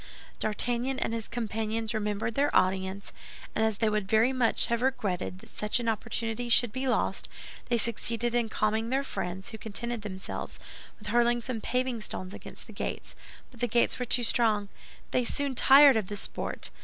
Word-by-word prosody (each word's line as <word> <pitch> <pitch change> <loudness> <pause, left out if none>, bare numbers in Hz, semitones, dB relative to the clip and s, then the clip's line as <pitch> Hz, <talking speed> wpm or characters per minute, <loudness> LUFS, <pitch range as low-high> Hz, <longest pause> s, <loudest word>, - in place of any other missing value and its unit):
D'Artagnan 240 +4 -1
and 230 - -2
his 225 -2 -4
companions 225 -1 -3
remembered 210 +1 -2
their 285 +5 +2
audience, 190 +1 +1 0.4
and 220 - +1
as 220 -2 +1
they 225 - +1
would 210 -2 0
very 225 +4 +4
much 245 -3 +2
have 235 0 -1
regretted 200 -9 -1
that - - -16
such 210 +3 +1
an 235 - -3
opportunity 225 +1 -2
should 235 -1 +5
be 260 +1 -2
lost, 250 - 0 0.4
they 240 - +3
succeeded 235 +1 +2
in 240 -2 +1
calming 220 +1 0
their 270 +2 +1
friends, 190 -7 -5
who 220 - -8
contented 235 +2 -3
themselves 190 -2 -6 0.4
with - - -9
hurling 240 0 +3
some 235 -1 -5
paving 250 -1 -1
stones 185 -2 -5
against - - -10
the - - -12
gates; - - -5 0.4
but 245 - -16
the 245 - +1
gates 235 +3 +2
were 250 - -1
too 245 +1 +2
strong. 220 -3 +2 0.4
They 250 - +2
soon 280 +3 -1
tired 275 +2 +7
of 210 -4 -1
the 205 - -5
sport. - - -3
230 Hz, 180 wpm, -29 LUFS, 210-240 Hz, 0.4 s, tired